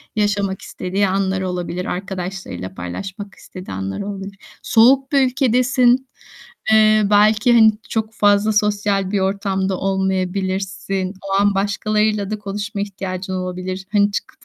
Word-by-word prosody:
yaşamak 200 -2 0
istediği 190 +2 -2
anlar 190 0 0
olabilir. 180 -1 -3
Arkadaşlarıyla 185 - -5
paylaşmak 195 - -7
istediği 185 - -10
anlar 95 - -4
olabilir. 195 0 -6 0.3
Soğuk 265 +4 +4
bir 275 -2 +4
ülkedesin. 255 0 +2 0.6
Eee, 215 0 +5
belki, 215 +3 +4
hani, 220 -2 +7 0.2
çok 220 0 -2
fazla 205 0 +3
sosyal 205 -2 +1
bir 205 - +1
ortamda 190 -1 -1
olmayabilirsin. 190 0 -2 0.2
O - - -1
an 205 -1 +2
başkalarıyla 210 +1 0
da 215 -1 -3
konuşma 205 +1 -4
ihtiyacın 190 -1 -5
olabilir. 185 +1 -4
Hani, 205 -1 +3
çıkıp - - -5
200 Hz, 125 wpm, -19 LUFS, 190-215 Hz, 0.6 s, hani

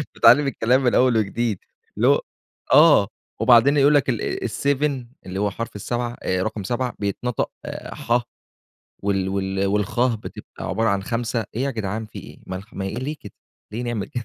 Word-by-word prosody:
باتعلّم 140 +5 +6
الكلام 130 0 +2
من 125 - +2
أول 125 -2 +4
وجديد. 110 0 -1 0.4
اللي - - +3
هو - - +4 0.5
آه، - - +7 0.3
وبعدين 125 +4 +6
يقول 145 +1 +5
لك 140 -2 +3
ال 120 0 -2
7 140 0 0 0.2
اللي 95 +1 -5
هو 100 0 +1
حرف 115 +2 -6
ال7 120 +3 -3
آآ، 95 0 0
رقَم 105 -1 -3
7 120 +4 -2
بيتنطق 105 +4 -2 0.4
ح 120 +1 0 0.8
وال 95 -1 0
وال 95 0 -1
والخ 105 +5 +1
بتبقى 110 - -9
عبارة 115 +3 +1
عن 100 -1 +1
5 115 +2 -2
إيه 125 - 0
يا 140 - 0
جدعان 110 -2 -3
في - - -10
إيه؟! - - -11
ما 95 - -4
الخ 100 +3 -11
ما 95 - -4
إيه، 95 - -4
ليه 145 +5 -4
كده، 105 - -11 0.4
ليه 115 +3 -3
نعمل 120 -5 -3
كده 120 -1 -5
115 Hz, 180 wpm, -22 LUFS, 100-125 Hz, 0.8 s, آه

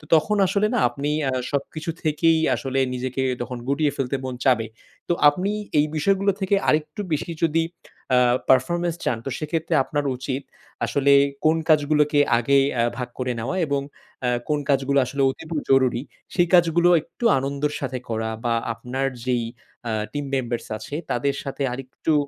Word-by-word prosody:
তখন 185 +7 +2
আসলে 200 +3 +2
না 245 - +2
আপনি 145 +1 -3 0.2
আ - - 0 0.2
সবকিছু 155 +3 -3
থেকেই 160 +1 +3 0.2
আসলে 135 -1 -2
নিজেকে 130 +1 -3 0.2
তখন 125 +1 -4
গুটিয়ে 145 +1 +2
ফেলতে 135 0 -1
মন 130 -1 -4
চাবে। 125 -4 +3 0.4
তো - - +2 0.2
আপনি 185 +7 -2 0.3
এই 145 - +4
বিষয়গুলো 195 +5 +2
থেকে 190 +1 +2
আরেকটু 155 +7 +1
বেশি 155 +3 -2
যদি 165 0 +3 0.5
আ - - +5 0.3
performance 170 +6 +2
চান 120 - 0
তো - - -2
সেক্ষেত্রে 160 +2 -2
আপনার 145 +1 -2
উচিত 130 +1 -3 0.4
আসলে 140 0 +3 0.3
কোন 160 +1 +4
কাজগুলোকে 150 -1 +3 0.2
আগে 140 +4 +3 0.2
আ - - +3
ভাগ 125 -1 -4
করে 125 0 -1
নেওয়া 125 +11 -3
এবং 140 -2 0 0.4
অ্যা 125 - +2 0.2
কোন 150 -1 +2
কাজগুলো 140 0 +3
আসলে 140 +3 -3
অতিব 160 +4 -12 0.2
জরুরি, 130 -3 +3 0.3
সেই 175 -1 +3
কাজগুলো 175 0 +5
একটু 235 - -7
আনন্দর 140 +2 -2
সাথে 130 -2 -3
করা 110 0 -2 0.2
বা 120 - +2 0.2
আপনার 125 +4 -3 0.2
যেই 125 -2 0 0.4
অ্যা 115 - -2 0.2
team 145 -1 -3
members 120 -3 -2
আছে, 110 +7 -7 0.2
তাদের 140 +3 0
সাথে 140 0 -4
আরেকটু 135 +4 -3
140 Hz, 160 wpm, -23 LUFS, 130-155 Hz, 0.5 s, আ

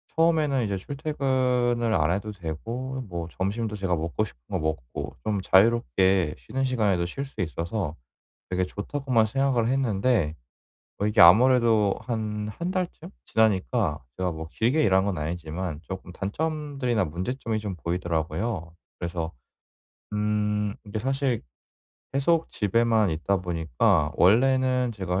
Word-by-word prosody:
처음에는 155 -6 +3
이제 100 -2 -1
출퇴근을 125 -3 0
안 80 -4 +2
해도 100 +3 -2
되고 115 +10 -5
뭐 85 -2 -4
점심도 105 +3 -1
제가 95 -3 0
먹고 85 +7 -1
싶은 - - -14
거 - - -1
먹고 80 -6 -4
좀 105 -2 0
자유롭게 95 -4 +3
쉬는 135 0 -3
시간에도 105 -9 +1
쉴 135 +11 -4
수 135 - -15
있어서 85 0 -3 0.5
'되게 90 0 0
좋다.'고만 115 +4 0
생각을 130 -1 +1
했는데 115 - +1 0.6
어 - - -1
이게 105 +1 +2
아무래도 110 +2 +6
한 105 -3 -3
1 170 - -4
달쯤 180 -2 -3
지나니까 100 - +1
제가 90 -2 -1
뭐 80 0 -7
길게 130 +8 +2
일한 95 -4 +4
건 100 -4 -1
아니지만 80 +1 -4
쪼끔 95 -1 -7
단점들이나 140 - -1
문제점이 110 - -3
좀 105 -3 -4
보이더라고요. 85 +2 -2 0.2
그래서 85 -1 -3 0.8
음 105 0 0
이게 105 +1 -4
사실 135 0 0 0.7
계속 160 +4 +2
집에만 110 0 +2
있다 85 +5 0
보니까 80 -4 +1
원래는 125 +4 +4
제가 95 -3 -2
105 Hz, 295 characters per minute, -26 LUFS, 90-125 Hz, 0.8 s, 아무래도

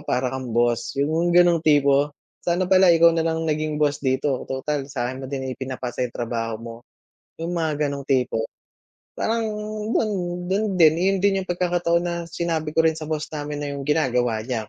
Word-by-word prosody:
para 125 0 0
kang 130 -2 -5
boss", 120 0 +1
’yong 160 +5 +1
gano'ng 175 -2 +5
tipo. 145 -1 +3 0.3
"Sana 175 +1 0
pala 190 0 +6
ikaw 170 +1 +6
na 165 0 0
lang 160 0 -1
naging 155 -1 -1
boss 145 -1 +1
dito, 130 0 0
total, 135 +1 -2
sa’kin 130 -2 -3
mo - - -5
din 130 -1 -4
ipinapasa 130 -1 -5
’yong 120 - -15
trabaho 115 -1 -2
mo", 115 0 -8 0.7
’yong 165 - -2
mga 155 -3 0
gano'ng 140 -1 -5
tipo. 125 -4 +1 0.8
Parang 230 +1 0 0.5
do’n, 215 - +1 0.4
do’n 200 +3 +1
din, 160 -3 +6
’yon 195 +1 +2
din 200 -1 +3
’yong 185 - -12
pagkakataon 175 -1 +1
na 175 -1 -1 0.2
sinabi 160 -2 -2
ko 160 - +4
rin 160 - +2
sa 155 -1 -6
boss 155 -1 -2
namin 145 -1 -4
na - - -3
’yong 140 - -5
ginagawa 125 -6 +1
niya, 115 -4 -3
150 Hz, 185 wpm, -23 LUFS, 130-170 Hz, 0.8 s, pala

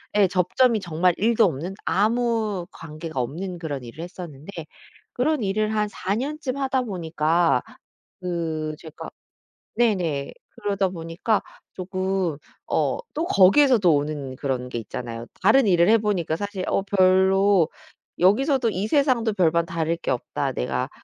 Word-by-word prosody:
예 200 -2 +5
접점이 195 +6 +2
정말 175 -1 +1
1도 230 +2 +3
없는 170 +3 -2
아무 220 -3 +1
관계가 160 -2 -7
없는 175 +8 -4
그런 145 -6 -5
일을 135 +8 -8
했었는데 175 -2 -9 0.6
그런 275 -1 0
일을 215 +2 0
한 210 0 +1
4 195 0 -2
년쯤 280 +1 -3
하다 265 -2 0
보니까 165 - +1 0.6
그 160 -3 -3
제가 160 -2 -9 0.7
네네. 175 -12 0 0.2
그러다 200 -2 -1
보니까 175 +5 -1 0.3
조금 185 -3 -2 0.3
어 - - +1 0.2
또 320 +3 -1
거기에서도 205 - +5
오는 145 -2 -3
그런 130 -3 -3
게 120 - -3
있잖아요. 115 +1 -6 0.2
다른 225 +3 +5
일을 175 +1 +4
해보니까 205 -8 +2
사실 200 -1 -4
어 - - +1
"별로 190 -2 +4 0.5
여기서도 245 - +3
이 200 +3 -2
세상도 250 -6 +2
별반 170 -3 +2
다를 165 0 -1
게 - - -3
없다." 125 - -2
내가 60 - -2
185 Hz, 270 characters per minute, -24 LUFS, 160-215 Hz, 0.7 s, 예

